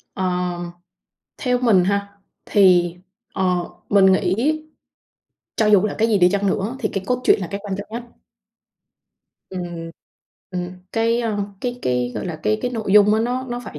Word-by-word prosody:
Ờm, 180 -2 -2 0.7
theo 250 -2 0
mình 220 -7 +4
ha, 200 +1 -2 0.3
thì, 180 -4 +4 0.4
ờ, 180 -2 0 0.2
mình 200 -1 +5
nghĩ 260 +11 +1 0.9
cho 220 - +2
dù 210 -2 +6
là 210 - -3
cái 225 - +2
gì 220 -3 +3
đi 180 -1 +5
chăng 200 0 0
nữa 205 +5 -1
thì - - -1
cái 195 - -2
cốt 250 0 0
truyện - - +4
là 185 - -4
cái 200 - -3
quan 200 -2 -3
trọng 205 - -7
nhất. 235 +2 -5 1.5
Ừm, 175 -3 -6 0.6
ừm, 180 -1 -4 0.2
cái, 230 +1 +1
à, 225 -3 -1 0.2
cái 245 0 -3
cái 125 -1 0
gọi - - -4
là, 170 -3 -4
cái 215 - +1
cái 250 - -1
nội 220 -5 -3
dung 210 0 +6
á, 220 - +1
nó 250 +3 -2
nó 240 0 -4
phải 150 - -8
200 Hz, 180 wpm, -21 LUFS, 180-225 Hz, 1.5 s, dù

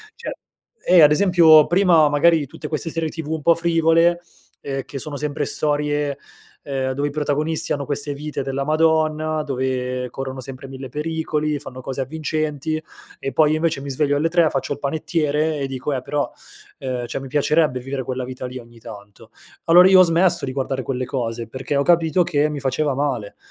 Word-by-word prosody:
cioè - - -6 0.5
eh, 180 -1 +6
ad 150 -1 +7
esempio, 165 -3 +6
prima 175 -4 +4
magari 160 +3 +4
di 145 - -4
tutte 150 - -8
queste 160 +1 -3
serie 165 0 -2
TV 160 -1 -7
un 160 -1 -2
po' 170 - +6
frivole, 165 +1 +2 0.4
ehm, 135 -1 -4
che 140 - -8
sono 150 +1 -6
sempre 150 0 -2
storie, 145 -1 -1 0.5
ehm, 135 -2 -2
dove 140 +2 -1
i - - -8
protagonisti 150 +1 -1
hanno 140 -1 -1
queste 145 +1 -3
vite 150 0 -5
della 135 +1 -3
madonna, 155 0 +1
dove 130 -2 -2
corrono 130 +1 -6
sempre 135 +1 -8
1000 130 0 -8
pericoli, 150 0 -2
fanno 130 -2 -9
cose 135 +1 -4
avvincenti 155 +1 -3 0.4
e 135 - -4
poi, 150 +3 +3
io 155 - +2
invece 160 -2 0
mi 140 0 -5
sveglio 145 +1 +1
alle 165 +3 +1
3, 170 -2 +3
faccio 135 +1 -2
il 145 - -10
panettiere 155 0 -1
e 135 - -2
dico: 135 +2 -4
"Eh 130 - -2
però, 145 +2 -2 0.5
ehm, 125 -2 -3
cioè - - -4
mi 135 - -8
piacerebbe 145 -1 +1
vivere 135 +1 -4
quella 130 0 -4
vita 130 0 -6
lì 125 - -8
ogni 120 -1 -13
tanto". 105 -1 -12 0.4
Allora, 175 +2 +7
io 190 -1 +7
ho - - +9
smesso 170 -1 +3
di 130 - -4
guardare 130 0 -2
quelle 130 -1 -3
cose, 115 -4 -4
perché 130 +4 -4
ho 140 - +2
capito 170 +2 +3
che 150 -3 +1
mi 150 - -4
faceva 140 +1 -1
male. 130 -7 -2
145 Hz, 195 wpm, -21 LUFS, 135-160 Hz, 0.5 s, ho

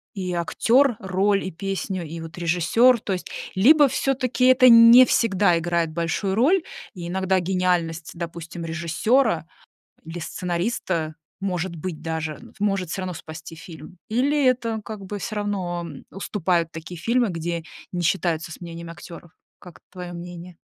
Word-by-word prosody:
и 185 -2 -3
актер, 235 +8 +2
роль, 195 +1 +1
и 190 - -4
песню, 190 0 -4
и 165 +2 -7
вот 165 0 -9
режиссер. 180 +9 +3
То 200 - -2
есть 180 - -5 0.3
либо 285 +9 +6
все-таки 255 -2 0
это 255 0 +7
не 230 +2 +9
всегда 195 -7 +2
играет 170 -1 0
большую 170 +4 -1
роль, 315 - +4 0.3
и 175 -1 -6
иногда 190 0 +1
гениальность, 175 -3 -1
допустим, 170 0 -7
режиссера, 170 - +1 0.6
или 165 +2 -7
сценариста 175 -2 -2 0.3
может 180 -2 -2
быть 160 -1 -6
даже, 160 -2 -4 0.2
может 195 -4 0
всё 190 - -3
равно 185 -1 -4
спасти 160 +1 -9
фильм? 165 +2 -12
Или 275 +5 +2
это 235 -3 +1
как 215 -3 -7
бы 205 +2 -5
всё 215 - -5
равно, 190 -4 -2
м, 145 -5 -10
уступают 180 -4 -1
такие 160 +2 -8
фильмы, 235 +4 +1
где 170 -1 -3 0.3
не 180 - -3
считаются 170 -1 0
с - - -13
мнением 170 0 -8
актеров? 170 0 -11 0.3
Как 180 -2 -14
твое 180 -1 -7
мнение? 175 0 -9
180 Hz, 150 wpm, -23 LUFS, 170-210 Hz, 0.6 s, не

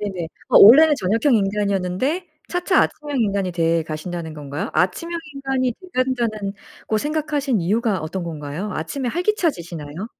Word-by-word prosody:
네네. 190 -5 -4 0.2
어, - - +6
원래는 295 +9 +9
저녁형 225 +8 +2
인간이었는데 200 - -1 0.2
차차 360 +2 +1
아침형 295 -4 -2
인간이 200 -4 0
돼 165 -1 +1
가신다는 160 +1 -5
건가요? 145 0 -5
아침형 190 - 0 0.2
인간이 270 -2 -1
돼 370 - -13
간다는 235 -6 -1 0.3
고 215 - +1
생각하신 295 - -1
이유가 210 +2 +1
어떤 165 +4 -4
건가요? 155 +5 -5
아침에 245 - -3
활기차지시나요? 200 - -2
210 Hz, 375 characters per minute, -21 LUFS, 170-275 Hz, 0.3 s, 원래는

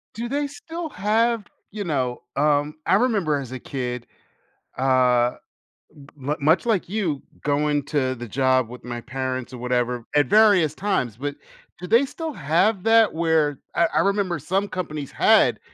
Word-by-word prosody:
Do 230 +2 -4
they 285 +2 -1
still 325 +3 -7
have, 225 +1 +1 0.3
you 210 0 -4
know, 130 -8 -2
um 145 +1 +1
I - - +4
remember 200 - +2
as 130 -3 -6
a 130 - -5
kid, 125 -2 -5 0.7
uh 125 -2 +3 0.8
m 145 +2 -2
much 155 +8 +3
like 215 -8 +1
you, 180 -9 -1 0.2
going 145 0 +1
to 130 -4 0
the 120 0 -8
job 130 +1 +2
with 125 +1 -11
my 120 -1 -5
parents 130 0 -4
or - - -6
whatever- 125 -1 -1
at 145 0 +4
various 200 -7 +5
times- 175 - -1
but 145 +2 -4 0.4
do 180 - -7
they 230 +7 +4
still 320 +3 -6
have 180 - +1
that 225 -1 +5
where 160 -3 +1 0.2
I 170 - +4
I - - +4
remember 200 -3 0
some 190 +7 -1
companies 155 -7 -5
had - - +4
150 Hz, 160 wpm, -23 LUFS, 130-205 Hz, 0.8 s, various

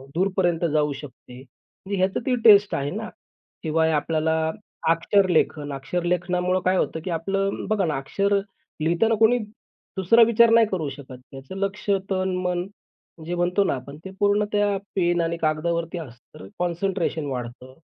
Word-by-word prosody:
दूरपर्यंत 180 -2 +1
जाऊ 150 -1 +2
शकते. 130 -3 -12
म्हणजे 190 +9 -9
ह्याचं 190 +1 +1
ती 255 -2 +2
टेस्ट 205 -2 +7
आहे 140 +1 -2
ना. 220 +3 -5 0.5
शिवाय 160 0 +1
आपल्याला 160 +1 0 0.5
अक्षरलेखन, 165 -4 +2
अक्षरलेखनामुळं 180 +5 -1
काय 185 0 +3
होतं, 160 - -1
की 185 - -3
आपलं 195 +4 -2
बघा 210 -4 +1
ना 150 -3 -1
अक्षर 200 +9 0 0.4
लिहिताना 175 +8 +2
कोणी 225 +2 +5 0.6
दुसरा 190 +5 +4
विचार 235 0 +5
नाही 230 -2 +6
करू 160 -6 -2
शकत. 135 -2 -10
त्याचं 135 +6 -10
लक्ष्य 200 0 0
तन-मन 185 -1 -1 0.6
जे 175 +2 -3
म्हणतो 180 +3 +1
ना - - 0
आपण 140 +3 -9
ते 190 - -7
पूर्ण 205 +1 +3
त्या 205 -1 +1 0.2
पेन 175 -2 +2
आणि 165 0 -1
कागदावरती 165 +2 -1
असतं, 125 -7 -11
तर 95 - -10
कॉन्सन्ट्रेशन 175 -2 -1
वाढतं. 125 -1 -6
175 Hz, 150 wpm, -24 LUFS, 155-195 Hz, 0.6 s, टेस्ट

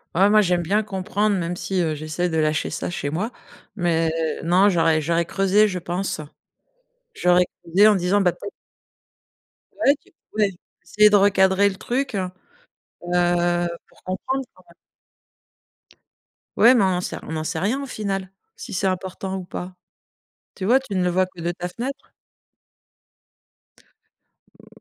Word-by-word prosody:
Ouais, 195 +3 +5
moi, 215 0 +6
j'aime 180 -2 +1
bien 205 +6 +1
comprendre, 205 +1 -1
même 175 0 -2
si, 190 +1 -2
heu, 155 -2 0
j'essaie 155 +4 -2
de 160 - -3
lâcher 155 0 +1
ça - - -4
chez 145 -4 -3
moi 195 - -2 0.5
mais 165 -3 +1 0.3
non, 180 +4 +4
j'aurais 165 -4 +3
j'aurais 170 +2 +1
creusé, 195 +4 +3
je 185 -2 -3
pense. 175 +1 -3 0.9
J'aurais 180 - +3 0.2
creusé 195 +6 +5
en 210 - +4
disant 185 +3 +2
bah 180 -2 +3
tu - - -17
es - - -3 1.3
ouais, 280 - +4
tu - - -25 0.2
voulais 210 -2 +1 0.3
essayer 210 +5 +4
de 210 - +4
recadrer 195 0 +4
le 195 - -7
truc, 255 +3 -2
heu? 185 -2 -2 0.8
Heu, 175 0 +2 0.2
pour - - -25
comprendre, 260 +9 -3
quoi. 185 - -21 1.9
Ouais, 245 +3 +7
mais 230 - +4
on - - +3
en 180 -1 0
sait - - -5
on - - -8
n'en 155 0 -3
sait 160 0 -2
rien 230 +10 0
au - - -4
final, 195 -6 -4 0.3
si 245 - -8
c'est 195 +1 -1
important 190 +1 -3
ou 185 - -7
pas? 180 +1 -7 0.8
Tu 190 - -5
vois? 245 +7 +4
Tu 245 -7 -7
ne 180 - +1
le 180 - +2
vois 185 +1 +2
que 185 -1 -14
de 170 +1 -1
ta 175 0 -5
fenêtre. 260 +9 -6 2.4
Mmh, - - -22
185 Hz, 165 wpm, -22 LUFS, 175-205 Hz, 2.4 s, Ouais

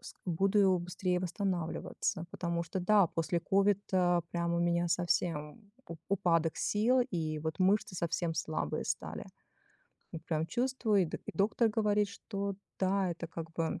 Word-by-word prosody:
с - - -10
буду 190 +2 +3
быстрее 180 +1 -1
восстанавливаться. 175 -2 -2
Потому 170 -2 -2
что, 170 +3 -4
да, 200 +1 +5
после 165 +1 -1
ковида 190 -3 +2
прям 170 0 -1
у - - +1
меня 175 0 +2
совсем 165 -1 0 0.3
у 170 - -6
упадок 165 -4 +2
сил 235 +5 +2
и 155 -4 -2
вот 160 +1 -4
мышцы 195 +3 +2
совсем 165 0 -1
слабые 155 - -2
стали. - - -4 0.9
Вот 160 -1 -6
прям 160 0 0
чувствую, 240 -1 +1
и - - +2
до - - -4
и - - -9
доктор 215 +3 +2
говорит, 210 -1 +2
что, 200 -1 -4 0.2
да, 190 -1 +1
это, 170 0 -5
как 165 0 -7
бы, 165 -1 -2
180 Hz, 150 wpm, -32 LUFS, 165-200 Hz, 0.9 s, да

